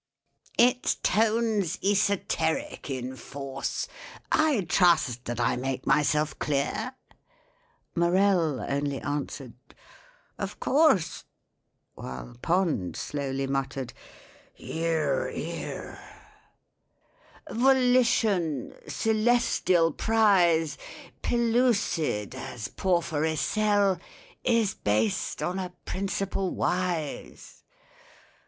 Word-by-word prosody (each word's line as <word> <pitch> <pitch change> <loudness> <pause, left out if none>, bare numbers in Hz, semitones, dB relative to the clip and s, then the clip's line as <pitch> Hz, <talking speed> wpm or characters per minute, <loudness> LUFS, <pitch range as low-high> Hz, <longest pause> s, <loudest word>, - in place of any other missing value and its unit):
"Its 250 +1 +4
tone's 220 -4 +2
esoteric 200 -6 0
in 130 -1 -4
force— 135 0 -5 0.4
I 310 -8 +3
trust 160 -9 +2
that 120 0 -4
I 120 - +2
make 130 +1 -3
myself 150 +1 +2
clear?" 150 - -1 1.0
MORELL 170 -4 +2
only 140 -1 -1
answered, 145 -3 -4 0.9
"Of - - -5
course," 275 - +2 0.7
While - - -8
POND 165 - 0
slowly 135 -2 -3
muttered, 135 -1 -3 0.6
"Hear, 165 - -1
hear." - - -6 1.5
"Volition—celestial 225 - +2
prize, 180 -6 +3 0.4
Pellucid 230 - +1
as 120 -5 -6
porphyry 160 -4 0
cell— 205 +1 +2 0.4
Is 230 -5 +2
based 105 +7 0
on 180 +4 -1
a 180 -1 -5
principle 195 0 -2
wise." 175 -5 -3
170 Hz, 75 wpm, -27 LUFS, 140-215 Hz, 1.5 s, Its